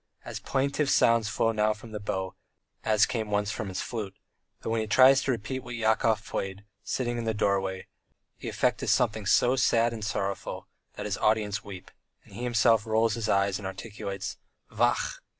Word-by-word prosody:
As -, -, -5 dB
plaintive 140 Hz, +2 st, 0 dB
sounds 115 Hz, -4 st, +4 dB
flow 115 Hz, +1 st, +1 dB
now 110 Hz, -1 st, +2 dB
from 110 Hz, +1 st, -12 dB
his 105 Hz, -, -5 dB
bow, 95 Hz, -2 st, -3 dB, 0.5 s
as 105 Hz, -1 st, +4 dB
came 110 Hz, -3 st, -3 dB
once 105 Hz, 0 st, 0 dB
from 110 Hz, -2 st, -4 dB
his 95 Hz, -1 st, -3 dB
flute, 105 Hz, -5 st, -5 dB, 0.4 s
but -, -, -4 dB
when 115 Hz, 0 st, +1 dB
he 110 Hz, -, -3 dB
tries 130 Hz, +4 st, +6 dB
to 135 Hz, -, 0 dB
repeat 120 Hz, +2 st, -3 dB
what 125 Hz, -1 st, -7 dB
Yakov 110 Hz, -1 st, +1 dB
played, 95 Hz, +1 st, -4 dB, 0.2 s
sitting 120 Hz, -2 st, -2 dB
in 115 Hz, -, -4 dB
the 110 Hz, -1 st, 0 dB
doorway, 95 Hz, -2 st, 0 dB, 0.5 s
the -, -, -5 dB
effect -, -, 0 dB
is -, -, -2 dB
something 110 Hz, -3 st, +1 dB
so 125 Hz, +5 st, +4 dB
sad 115 Hz, -2 st, +3 dB
and 110 Hz, -2 st, -6 dB
sorrowful 100 Hz, -1 st, -3 dB, 0.3 s
that -, -, -6 dB
his -, -, -2 dB
audience 110 Hz, -1 st, +1 dB
weep, 95 Hz, -3 st, -10 dB, 0.3 s
and -, -, -18 dB
he 110 Hz, -, -7 dB
himself 115 Hz, -2 st, +3 dB
rolls 110 Hz, 0 st, +2 dB
his 110 Hz, -1 st, -3 dB
eyes 100 Hz, 0 st, +2 dB
and 100 Hz, -, -5 dB
articulates 100 Hz, -1 st, -6 dB, 0.3 s
"Vachhh! -, -, +1 dB
110 Hz, 185 wpm, -28 LUFS, 100-115 Hz, 0.5 s, tries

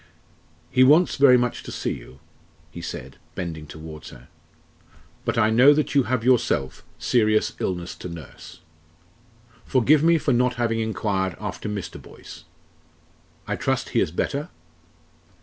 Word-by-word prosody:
"He 130 Hz, -, +5 dB
wants 155 Hz, +7 st, +5 dB
very 135 Hz, -2 st, +7 dB
much 120 Hz, 0 st, -1 dB
to -, -, -9 dB
see -, -, -3 dB
you," 65 Hz, +3 st, -12 dB, 0.5 s
he 85 Hz, -, -8 dB
said, 85 Hz, -, -7 dB, 0.2 s
bending 80 Hz, -3 st, -5 dB
towards 80 Hz, 0 st, -10 dB
her; 60 Hz, +1 st, -15 dB, 1.0 s
"but 115 Hz, 0 st, -1 dB
I 110 Hz, -1 st, +3 dB
know 130 Hz, +6 st, +6 dB
that 150 Hz, -, -1 dB
you 140 Hz, -3 st, +3 dB
have 125 Hz, -3 st, 0 dB
yourself 120 Hz, -, +1 dB
serious 110 Hz, -3 st, +2 dB
illness 90 Hz, -1 st, -3 dB
to 90 Hz, -, -7 dB
nurse. 85 Hz, -2 st, -11 dB, 1.0 s
Forgive 140 Hz, +4 st, +3 dB
me 165 Hz, +1 st, +4 dB
for 140 Hz, -3 st, 0 dB
not 125 Hz, +1 st, +2 dB
having 115 Hz, -2 st, 0 dB
enquired 95 Hz, -3 st, -1 dB
after -, -, -5 dB
Mr. 100 Hz, -3 st, -6 dB
Boyce. -, -, -13 dB, 1.0 s
I -, -, -2 dB
trust -, -, -1 dB
he -, -, +1 dB
is -, -, +1 dB
better?" 140 Hz, -, -3 dB
115 Hz, 145 wpm, -23 LUFS, 85-130 Hz, 1.0 s, very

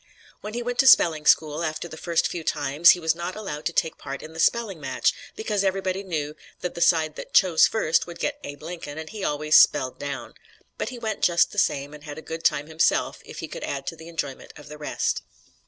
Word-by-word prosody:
When 215 Hz, +2 st, -7 dB
he 240 Hz, -, -2 dB
went 245 Hz, 0 st, -4 dB
to 265 Hz, -, +5 dB
spelling 160 Hz, -10 st, +6 dB
school, 155 Hz, +1 st, +3 dB
after 155 Hz, +1 st, -3 dB
the 160 Hz, -, -9 dB
first 170 Hz, +1 st, 0 dB
few 170 Hz, -, -5 dB
times, 150 Hz, +2 st, +3 dB
he 180 Hz, -, +6 dB
was 160 Hz, -1 st, +1 dB
not 175 Hz, +2 st, -5 dB
allowed 175 Hz, -8 st, -4 dB
to -, -, -2 dB
take 160 Hz, -1 st, -1 dB
part 135 Hz, 0 st, -7 dB
in 160 Hz, -, -10 dB
the 160 Hz, -, -9 dB
spelling 200 Hz, -3 st, +1 dB
match 130 Hz, -2 st, +1 dB, 0.2 s
because 210 Hz, -2 st, -1 dB
everybody 190 Hz, 0 st, -1 dB
knew 155 Hz, -6 st, -4 dB, 0.3 s
that 180 Hz, -, -3 dB
the 170 Hz, -, -7 dB
side 160 Hz, -3 st, +3 dB
that -, -, -8 dB
"chose 175 Hz, -4 st, +6 dB
first" 170 Hz, -8 st, +1 dB
would 170 Hz, -, -8 dB
get 290 Hz, 0 st, -2 dB
Abe 145 Hz, 0 st, -8 dB
Lincoln 165 Hz, -3 st, -7 dB
and 160 Hz, 0 st, -7 dB
he 215 Hz, -3 st, -6 dB
always 150 Hz, 0 st, +3 dB
"spelled 130 Hz, -3 st, +1 dB
down." 140 Hz, -4 st, -5 dB, 0.5 s
But -, -, -2 dB
he 250 Hz, -, -8 dB
went 220 Hz, -3 st, -4 dB
just 170 Hz, -1 st, +3 dB
the -, -, -1 dB
same 140 Hz, +1 st, 0 dB
and 150 Hz, -1 st, -12 dB
had 145 Hz, -1 st, -8 dB
a 160 Hz, -, -8 dB
good 165 Hz, 0 st, -6 dB
time 145 Hz, -, +2 dB
himself 160 Hz, +1 st, +1 dB
if -, -, -9 dB
he -, -, -5 dB
could -, -, -8 dB
add 140 Hz, -1 st, -4 dB
to 165 Hz, -, -4 dB
the 160 Hz, 0 st, -12 dB
enjoyment 150 Hz, -5 st, -5 dB
of 150 Hz, -, -13 dB
the 150 Hz, 0 st, -10 dB
rest. 150 Hz, -, -1 dB
160 Hz, 235 wpm, -25 LUFS, 150-185 Hz, 0.5 s, spelling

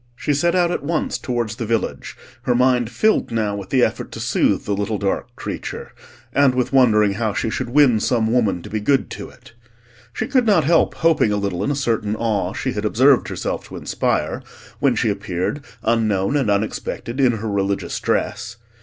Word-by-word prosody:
She 145 Hz, -, -1 dB
set 170 Hz, +5 st, +1 dB
out 175 Hz, -1 st, +2 dB
at -, -, -2 dB
once 155 Hz, +2 st, -2 dB
towards 120 Hz, -3 st, -3 dB
the 115 Hz, -, -3 dB
village, 115 Hz, -1 st, -2 dB, 0.2 s
her 125 Hz, -, +1 dB
mind 125 Hz, -2 st, +2 dB
filled 215 Hz, -, +1 dB
now 110 Hz, -3 st, -1 dB
with 100 Hz, -2 st, -7 dB
the 130 Hz, -2 st, +3 dB
effort -, -, -1 dB
to -, -, -7 dB
soothe -, -, +1 dB
the 105 Hz, -, -1 dB
little 105 Hz, +2 st, -1 dB
dark 100 Hz, -1 st, -2 dB
creature, -, -, -6 dB, 0.4 s
and 140 Hz, -2 st, +4 dB
with 125 Hz, +1 st, -1 dB
wondering 105 Hz, -6 st, +4 dB
how 110 Hz, 0 st, -1 dB
she 115 Hz, -, -1 dB
should -, -, -3 dB
win 130 Hz, -4 st, +4 dB
some 115 Hz, 0 st, +1 dB
woman 105 Hz, -8 st, +1 dB
to -, -, -9 dB
be 110 Hz, -, -1 dB
good 135 Hz, +6 st, +1 dB
to -, -, -7 dB
it. -, -, -18 dB, 0.6 s
She -, -, -3 dB
could 255 Hz, -4 st, +1 dB
not 190 Hz, -7 st, +4 dB
help 165 Hz, +3 st, +3 dB
hoping 160 Hz, -9 st, +2 dB
a 105 Hz, -, +1 dB
little 100 Hz, -3 st, -2 dB
in -, -, -1 dB
a 145 Hz, -, 0 dB
certain 115 Hz, -6 st, -1 dB
awe 105 Hz, -5 st, -1 dB
she 130 Hz, -, -2 dB
had 105 Hz, -4 st, -4 dB
observed 130 Hz, +5 st, +4 dB
herself -, -, -4 dB
to -, -, -10 dB
inspire, -, -, -1 dB, 0.4 s
when -, -, +2 dB
she 110 Hz, -, +1 dB
appeared, 100 Hz, +7 st, -3 dB, 0.2 s
unknown 110 Hz, -1 st, +1 dB
and 135 Hz, -7 st, +1 dB
unexpected, 110 Hz, +4 st, -2 dB
in 130 Hz, -3 st, +4 dB
her 110 Hz, 0 st, -4 dB
religious 100 Hz, 0 st, -1 dB
dress. 120 Hz, -, -2 dB
115 Hz, 200 wpm, -20 LUFS, 105-135 Hz, 0.6 s, and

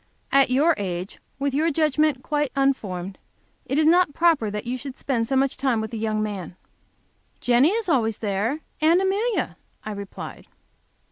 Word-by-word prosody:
At 275 Hz, -1 st, +5 dB
your 290 Hz, +7 st, +4 dB
age, 180 Hz, -1 st, -4 dB, 0.2 s
with 275 Hz, 0 st, -1 dB
your 310 Hz, +4 st, +2 dB
judgment 305 Hz, -3 st, +1 dB
quite 295 Hz, -3 st, -1 dB
unformed, 200 Hz, -9 st, -1 dB, 0.5 s
it 270 Hz, -, -1 dB
is 310 Hz, -, +3 dB
not 335 Hz, -2 st, +4 dB
proper 325 Hz, -10 st, +3 dB
that 210 Hz, +2 st, -5 dB
you 245 Hz, +2 st, -2 dB
should 260 Hz, +1 st, -8 dB
spend 235 Hz, -5 st, -1 dB
so 270 Hz, -, 0 dB
much 270 Hz, 0 st, +1 dB
time 260 Hz, -4 st, +1 dB
with 220 Hz, +2 st, -5 dB
a -, -, -3 dB
young 215 Hz, -1 st, -1 dB
man. 195 Hz, -5 st, -5 dB, 0.8 s
"Jenny 245 Hz, +5 st, +4 dB
is 440 Hz, +1 st, -1 dB
always 225 Hz, -, +1 dB
there, 220 Hz, +8 st, -1 dB, 0.2 s
and 325 Hz, +3 st, +5 dB
Amelia," 405 Hz, +5 st, 0 dB, 0.3 s
I 215 Hz, -, -4 dB
replied. 200 Hz, -1 st, -8 dB
265 Hz, 165 wpm, -24 LUFS, 215-310 Hz, 0.8 s, At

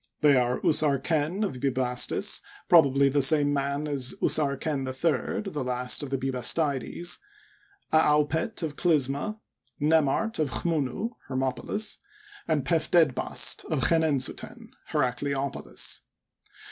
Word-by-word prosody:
They 145 Hz, -2 st, +5 dB
are 125 Hz, -1 st, +1 dB
Usarlcen 155 Hz, +5 st, +1 dB
of 135 Hz, -10 st, -5 dB
Bubastis, 130 Hz, -2 st, 0 dB, 0.3 s
probably 140 Hz, -5 st, +5 dB
the 140 Hz, +1 st, +2 dB
same 145 Hz, 0 st, +5 dB
man 140 Hz, +1 st, -2 dB
as 135 Hz, -4 st, -1 dB
Usarken 140 Hz, -1 st, 0 dB
III, 155 Hz, +8 st, -2 dB
the 145 Hz, -, -2 dB
last 125 Hz, 0 st, -1 dB
of 145 Hz, -, -5 dB
the 135 Hz, -, -1 dB
Bubastides, 135 Hz, +5 st, 0 dB, 0.7 s
Aaupet 155 Hz, +6 st, +2 dB
of 150 Hz, -2 st, -3 dB
Clysma, 155 Hz, +5 st, +1 dB, 0.4 s
Nemart 160 Hz, +8 st, +1 dB
of 155 Hz, -3 st, +1 dB
Chntunu 145 Hz, -, -2 dB, 0.2 s
(Hermopolis), 130 Hz, -, -2 dB, 0.5 s
and 150 Hz, -4 st, 0 dB
Pef^ 165 Hz, -1 st, 0 dB
dedbast 160 Hz, -7 st, +2 dB
of -, -, -2 dB
Chenensuten 155 Hz, -6 st, 0 dB, 0.2 s
(Heracleopolis). 140 Hz, 0 st, -2 dB
145 Hz, 110 wpm, -27 LUFS, 130-160 Hz, 0.7 s, They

